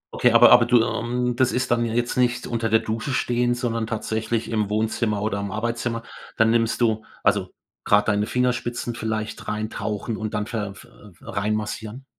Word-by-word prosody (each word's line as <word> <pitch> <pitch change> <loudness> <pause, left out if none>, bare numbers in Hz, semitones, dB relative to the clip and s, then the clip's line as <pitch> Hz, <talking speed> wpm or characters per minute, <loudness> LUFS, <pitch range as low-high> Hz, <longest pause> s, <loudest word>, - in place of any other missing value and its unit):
Okay - - +4
aber - - +7
aber 120 - +8
du, 120 -1 +5
ähm 125 +1 -1
das 130 0 +2
ist 125 0 -1
dann 120 0 +3
ja 115 - -3
jetzt 120 +1 -1
nicht 125 0 +1
unter 115 -1 -1
der 110 - +5
Dusche 115 +5 -3
stehen 120 -1 +1
sondern 115 -2 -2
tatsächlich 110 +1 -2
im 105 -2 0
Wohnzimmer 110 0 0
oder 105 -2 -1
im 100 0 -3
Arbeitszimmer 115 +2 -2 0.3
dann 110 0 +4
nimmst 115 +1 +1
du 110 -2 +2 0.2
also - - +1 0.3
gerade 105 0 +4
deine 105 +1 0
Fingerspitzen 120 -1 -1
vielleicht 110 -1 -4
rein 110 +1 -3
tauchen 105 +2 -3
und 110 -1 -4
dann 105 - -1
ver 105 -4 -4
ve 120 - -14 0.3
reinmassieren? 110 +4 -3
115 Hz, 180 wpm, -23 LUFS, 110-120 Hz, 0.3 s, aber